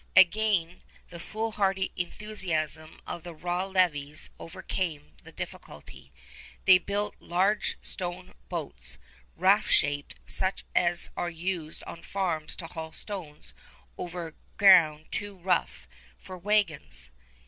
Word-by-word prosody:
Again, 190 -2 +5 0.3
the 170 - -8
fool 220 +5 -3
hardy 195 -2 +1
enthusiasm 170 -5 -2
of 170 - -5
the 175 -1 -8
raw 175 +3 -1
levies 155 -6 +1
overcame 165 -2 -4
the - - -13
difficulty. - - -9 0.5
They 185 -1 +9
built 205 +2 -1
large 190 +4 +2
stone 180 0 -5 0.2
boats, - - -3 0.4
raft - - +4
shaped, 145 0 +2
such 190 0 +1
as 175 -1 +2
are 175 - -1
used 170 -1 -3
on 165 - -8
farms 175 -6 -2
to 170 - -6
haul 160 -1 -6
stones 170 -8 -7 0.4
over 175 -2 -5 0.2
ground 165 -6 +7
too 205 -1 -3
rough 180 0 0 0.3
for 185 - -9
wagons. 175 - +1
175 Hz, 115 wpm, -29 LUFS, 160-190 Hz, 0.5 s, They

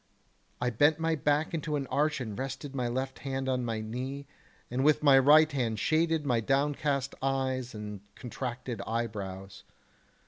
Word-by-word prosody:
I 125 0 0
bent 145 +7 +4
my 165 0 0
back 150 +2 +1
into 155 -2 -2
an 140 -2 -1
arch 150 +1 +1
and 110 -5 -5
rested 135 +2 -5
my 125 -3 -1
left 130 +2 -3
hand 135 -1 -3
on 130 -1 0
my 115 -2 -2
knee, 130 +6 -5 0.5
and 130 +2 0
with 150 +1 +4
my 140 -2 +7
right 155 +3 +6
hand 120 -6 -1
shaded 160 +4 +1
my 120 -4 +2
downcast 140 +2 0
eyes 130 -2 -1
and 105 -2 -6
contracted 125 -3 -5
eyebrows. 100 -4 -4
135 Hz, 160 wpm, -30 LUFS, 120-145 Hz, 0.5 s, my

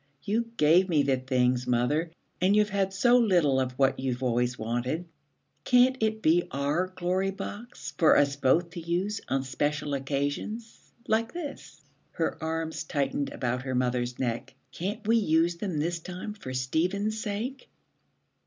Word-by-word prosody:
'You 230 +3 -1
gave 170 +5 +5
me 150 -4 +3
the 135 -1 +2
things, 125 -1 +1
mother, 125 +7 +1 0.3
and 190 +3 +4
you've 210 -1 +3
had 195 -1 +1
so 240 +6 +4
little 175 - +3
of 130 -1 -1
what 135 +1 +2
you've 130 -1 -2
always 125 0 +1
wanted. 120 +9 -2 0.6
Can't 250 - +5
it 220 0 0
be 175 +3 +3
our 145 +6 0
Glory 185 +1 -1
Box, 205 +4 -7
for 160 - +6
us 140 -1 +3
both 155 +5 +2
to 175 - -6
use 180 +5 -2
on 135 0 +1
special 145 +2 -2
occasions 145 - -3 0.2
like 225 +1 +1
this?' 325 -5 -8 0.3
Her - - -2
arms 160 -1 -2
tightened 140 -2 -1
about 125 0 -2
her 130 0 -3
mother's 125 -1 0
neck. 120 -2 -3 0.2
'Can't 205 - -4
we 230 +1 +5
use 170 -4 +2
them 180 -3 -3
this 165 +3 -1
time 180 +5 -6
for 200 -11 -8
Stephen's 180 +12 0
sake?' 225 +7 -4
160 Hz, 155 wpm, -28 LUFS, 135-200 Hz, 0.6 s, for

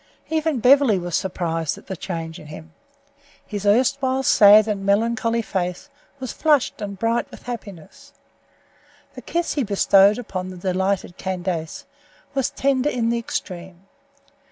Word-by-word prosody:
Even 315 -4 0
Beverly 255 -2 +5
was 175 -1 -3
surprised 165 -4 -2
at - - -15
the 190 - -5
change 165 -3 -6
in 150 - -12
him. 160 +2 -11 0.7
His 205 -1 -4
erstwhile 260 +4 +2
sad 210 -2 +7
and 205 -2 -2
melancholy 230 +3 +1
face 185 +6 -4 0.3
was 260 -4 -5
flushed 300 -4 +1
and 200 -1 -5
bright 230 +3 0
with - - -13
happiness. 205 -9 -9 1.0
The - - -9
kiss 345 0 -2
he 285 - 0
bestowed 200 -1 +4
upon 185 -6 -5
the 185 - -9
delighted 185 0 -1
Candace 180 -4 -4 0.5
was 270 -2 0
tender 275 +1 0
in 235 -4 -1
the 235 0 0
extreme. 185 -4 -6
205 Hz, 140 wpm, -22 LUFS, 185-245 Hz, 1.0 s, sad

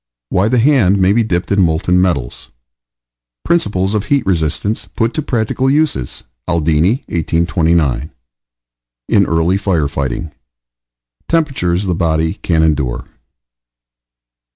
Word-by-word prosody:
WHY 95 +2 +1
THE 125 - +1
HAND 115 -7 +3
MAY 95 +1 +3
BE 115 - +3
DIPPED 90 -5 -2
IN 100 0 +3
MOLTEN 90 +1 +2
METALS. 70 -10 -2 1.0
PRINCIPLES 105 - 0
OF 105 -1 -1
HEAT 140 +3 +1
RESISTANCE 90 +3 -1
PUT 115 +1 0
TO 155 - -1
PRACTICAL 130 -1 -1
USES: 145 - -1 0.2
ALDINI, 85 - +1
1829. 80 -3 0 1.0
IN - - +4
EARLY 85 +3 +1
FIRE 90 -7 0
FIGHTING. 70 +2 -4 1.0
TEMPERATURES 130 - 0
THE 90 - 0
BODY 80 -1 0
CAN 80 -2 0
ENDURE. 70 -5 -1
90 Hz, 115 wpm, -15 LUFS, 80-105 Hz, 1.0 s, IN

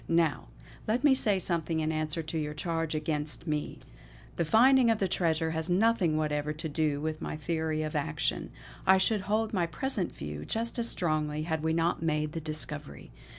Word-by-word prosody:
Now, 165 -3 +1 0.4
let 225 +5 +1
me 290 -2 +6
say 210 -6 +2
something 170 -3 -1
in 155 0 0
answer 155 +1 -2
to 160 +1 -4
your 150 0 -3
charge 165 0 -2
against 150 0 -2
me. 150 -2 -2 0.6
The - - +1
finding 245 - +5
of 225 - +3
the 195 - 0
treasure 160 -2 +1
has 160 +1 -2
nothing 185 -4 +3
whatever 150 -1 -1
to 160 +2 -5
do 150 -1 0
with 155 +1 -3
my - - -4
theory 160 0 -1
of 155 - -4
action; 75 - -1 0.4
I 190 0 +7
should 205 +2 +2
hold 215 +3 0
my 175 -4 +1
present 205 +1 -2
view 75 0 -6
just 230 - -2
as 235 - +3
strongly 155 -3 0
had 160 -1 -2
we 160 +1 0
not 165 +1 +1
made 155 -2 0
the 165 - -4
discovery. 150 - -6
160 Hz, 190 wpm, -30 LUFS, 155-190 Hz, 0.6 s, I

